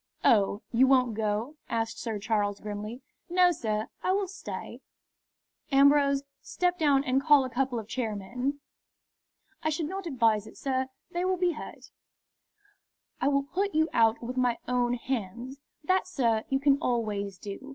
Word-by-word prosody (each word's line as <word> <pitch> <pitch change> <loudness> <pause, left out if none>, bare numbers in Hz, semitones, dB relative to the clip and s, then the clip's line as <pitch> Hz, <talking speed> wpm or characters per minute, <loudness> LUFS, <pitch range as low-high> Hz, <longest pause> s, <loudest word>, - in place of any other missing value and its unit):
"Oh, 205 -1 +3
you 250 +3 +5
won't 255 -3 +4
go?" 220 +7 -2
asked 225 0 -2
Sir 225 -3 -3
Charles, 205 -1 -1
grimly. 210 +4 -6 0.3
"No, 360 0 +5
sir; 215 -8 -2
I 370 - +1
will 395 0 0
stay." 385 +1 -7 0.9
"Ambrose, 280 0 +5 0.2
step 360 0 -1
down 285 -3 +4
and 265 -1 +1
call 290 -1 +6
a 255 - -6
couple 255 0 0
of 220 -2 -5
chairmen." 245 +5 -3 1.0
"I 310 - 0
should 310 +1 -1
not 380 +3 -5
advise 225 -7 +2
it, - - -13
sir. 260 -1 -1 0.2
They 350 +1 -1
will 370 0 +1
be 360 0 +2
hurt." 305 - -9 1.3
"I - - +2
will 280 -1 +2
put 390 +7 -2
you 315 +1 +3
out 225 0 +3
with 250 +2 -5
my 245 -2 +2
own 245 0 +1
hands." 245 +2 -4 0.2
"That, 370 +3 +1
sir, 230 -10 +1
you 270 - +1
can 280 0 +3
always 210 - -1
do. 205 +8 -8
255 Hz, 160 wpm, -28 LUFS, 225-290 Hz, 1.3 s, call